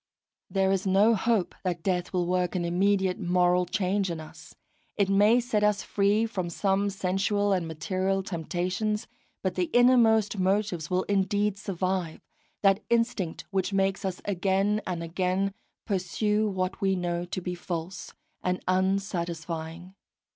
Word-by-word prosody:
There 190 -1 +2
is 195 0 0
no 200 +4 +5
hope 220 -2 +1
that 175 -3 -2
death 180 -1 -1
will 180 -2 0
work 180 +1 0
an 175 -1 0
immediate 190 +1 +1
moral 180 -1 +2
change 190 +1 0
in 165 -2 -4
us; 155 - -12 0.4
it 200 -2 +2
may 205 +4 +5
set 230 -4 0
us 210 -1 +2
free 205 +2 +2
from 190 -6 -3
some 195 +3 +1
sensual 200 +1 0
and 180 -3 -1
material 185 +4 -1
temptations, 185 +4 -2 0.4
but 185 -1 0
the 180 0 0
innermost 225 -4 +4
motives 190 -4 0
will 185 +1 +1
indeed 205 +1 +1
survive, 185 -3 -2 0.4
that 195 0 +4
instinct 230 -8 0
which 195 0 -1
makes 195 0 +1
us 190 -2 -4
again 195 +2 +1
and 175 -2 -3
again 185 +3 -1 0.3
pursue 210 +2 0
what 185 0 -3
we 195 -1 +2
know 175 -1 -2
to 180 - -4
be 180 0 -4
false 175 0 -5 0.3
and 180 0 -1
unsatisfying. 175 -2 -2
190 Hz, 145 wpm, -27 LUFS, 180-200 Hz, 0.4 s, no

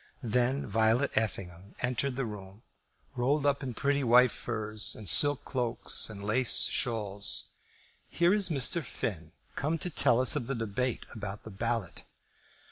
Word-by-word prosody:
Then 125 +4 0
Violet 115 +5 +1
Effingham 100 -3 -4
entered 125 +2 -1
the 135 0 -3
room, 105 -1 -10 0.5
rolled 140 +4 0
up 140 0 +1
in 130 -4 -6
pretty 140 +2 0
white 125 0 +5
furs, 110 0 -2
and 105 - -9
silk 145 - +6
cloaks, 125 -4 +1
and 100 -2 -9
lace 115 +4 +2
shawls. 105 -5 -1 0.6
"Here 175 +2 +2
is 205 -2 0
Mr. 155 +2 +1
Finn, 90 - -6 0.2
come 155 +4 -2
to 180 +2 -1
tell 125 -5 +4
us 130 +3 +5
of 125 -6 -3
the 135 - -3
debate 115 +2 -3
about 105 -2 -7
the 110 - -10
ballot." 115 -1 -4
120 Hz, 150 wpm, -29 LUFS, 105-135 Hz, 0.6 s, silk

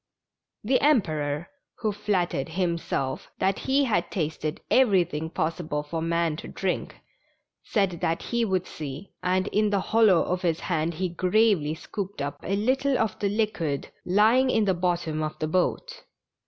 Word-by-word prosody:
The 255 +5 +2
Emperor, 155 - +1 0.3
who 215 -2 -1
flattered 180 -8 -1
himself 170 -6 -2
that 190 +1 +1
he 275 +2 +4
had 235 -6 0
tasted 155 -2 -3
everything 180 - +3
possible 160 -3 -2
for 160 +2 -4
man 165 -1 0
to - - -8
drink, 190 -2 -3 0.7
said 195 -4 +1
that 165 0 0
he 235 -1 0
would 190 -4 0
see, 150 +4 -7
and 185 +1 +1
in 210 0 +2
the 200 -1 +1
hollow 215 -6 +6
of 180 0 -2
his 170 -3 0
hand 165 -1 -1
he 185 +3 -1
gravely 180 -3 +2
scooped 200 +4 -6
up 145 0 -3
a 195 - -1
little 260 +5 +1
of 225 -3 -1
the 200 - +1
liquid 195 -9 -1
lying 220 +8 +4
in 220 -4 +3
the 190 - +3
bottom 175 -3 -1
of 155 0 -3
the 155 - -2
boat. - - -1
180 Hz, 155 wpm, -26 LUFS, 160-210 Hz, 0.7 s, hollow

